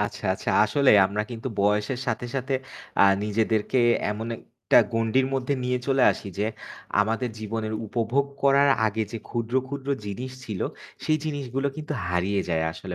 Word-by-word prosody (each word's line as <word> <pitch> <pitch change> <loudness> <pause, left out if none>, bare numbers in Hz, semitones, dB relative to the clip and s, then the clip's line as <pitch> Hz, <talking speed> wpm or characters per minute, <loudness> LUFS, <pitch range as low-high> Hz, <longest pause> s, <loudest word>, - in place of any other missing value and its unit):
আচ্ছা, 105 - -3
আচ্ছা। - - -3
আসলে 135 +5 +3 0.2
আমরা 105 +2 -2
কিন্তু 120 +2 -5
বয়সের 105 +5 +1
সাথে, 120 0 -1
সাথে 135 +1 -2 0.5
আ - - +8 0.2
নিজেদেরকে 110 +3 +1 0.3
এমন 110 +2 -4
একটা - - -1 0.2
গন্ডির 115 +3 +2
মধ্যে 135 +1 0
নিয়ে 125 0 +1
চলে 135 -1 +3
আসি 100 - -8
যে, 105 - +1 0.6
আমাদের 115 +4 0
জীবনের 110 0 -3
উপভোগ 120 +5 0 0.2
করার 140 +1 +5 0.2
আগে 110 +1 -1
যে 115 - -3
ক্ষুদ্র, 120 0 -3
ক্ষুদ্র 140 0 -6 0.2
জিনিস 110 +6 -5
ছিল 105 -5 -5 0.4
সেই 155 0 +2
জিনিসগুলো 140 -3 -2
কিন্তু 155 -1 -5
হারিয়ে 90 +3 0
যায় 80 -2 +1
আসলে 90 +2 -7
115 Hz, 160 wpm, -25 LUFS, 105-130 Hz, 0.6 s, আ